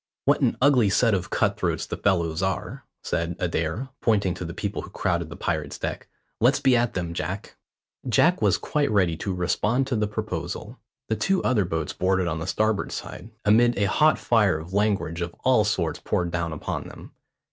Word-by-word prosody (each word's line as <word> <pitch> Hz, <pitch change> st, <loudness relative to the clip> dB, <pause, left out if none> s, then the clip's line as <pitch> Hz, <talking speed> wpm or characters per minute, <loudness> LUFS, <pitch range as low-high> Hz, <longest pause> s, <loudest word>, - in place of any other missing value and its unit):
"What -, -, +3 dB
an -, -, +2 dB
ugly 130 Hz, -7 st, +5 dB
set 115 Hz, +3 st, +3 dB
of 95 Hz, -3 st, -1 dB
cut -, -, +1 dB
throats -, -, -1 dB
the -, -, -4 dB
fellows 85 Hz, -4 st, 0 dB
are," 95 Hz, -1 st, -3 dB, 0.2 s
said 85 Hz, +1 st, -2 dB
Adair, 85 Hz, +8 st, -2 dB
pointing 100 Hz, -5 st, +2 dB
to 90 Hz, -, -6 dB
the 85 Hz, -, -5 dB
people 100 Hz, +1 st, -3 dB
who -, -, -10 dB
crowded 85 Hz, -4 st, -1 dB
the 85 Hz, -, -8 dB
pirate's 75 Hz, -3 st, -3 dB
deck. -, -, -4 dB, 0.3 s
"Let's 130 Hz, +5 st, +4 dB
be 135 Hz, -3 st, +4 dB
at 120 Hz, -1 st, +1 dB
them, 85 Hz, -2 st, -2 dB
Jack." 90 Hz, +5 st, -5 dB, 0.5 s
Jack -, -, +3 dB
was -, -, +3 dB
quite 150 Hz, -1 st, 0 dB
ready 95 Hz, -6 st, +2 dB
to 100 Hz, -, -3 dB
respond 105 Hz, +8 st, 0 dB
to 130 Hz, -, -2 dB
the 105 Hz, -1 st, +1 dB
proposal. 105 Hz, +2 st, -5 dB, 0.3 s
The 110 Hz, -, +1 dB
two 195 Hz, -, +1 dB
other 110 Hz, -7 st, +2 dB
boats 80 Hz, -3 st, -3 dB
boarded 95 Hz, 0 st, +1 dB
on 80 Hz, -1 st, -2 dB
the 80 Hz, -, -5 dB
starboard 110 Hz, +2 st, 0 dB
side, 95 Hz, -, -7 dB, 0.2 s
amid 120 Hz, +3 st, +4 dB
a 100 Hz, -, +2 dB
hot 155 Hz, +10 st, +3 dB
fire 105 Hz, -8 st, +2 dB
of 80 Hz, +4 st, -9 dB
langrage 100 Hz, -5 st, 0 dB
of 85 Hz, 0 st, -4 dB
all 125 Hz, -4 st, +4 dB
sorts 95 Hz, -7 st, -1 dB
poured 85 Hz, -1 st, -1 dB
down 85 Hz, -1 st, -2 dB
upon 80 Hz, -, -4 dB
them. -, -, -12 dB
95 Hz, 195 wpm, -25 LUFS, 85-110 Hz, 0.5 s, ugly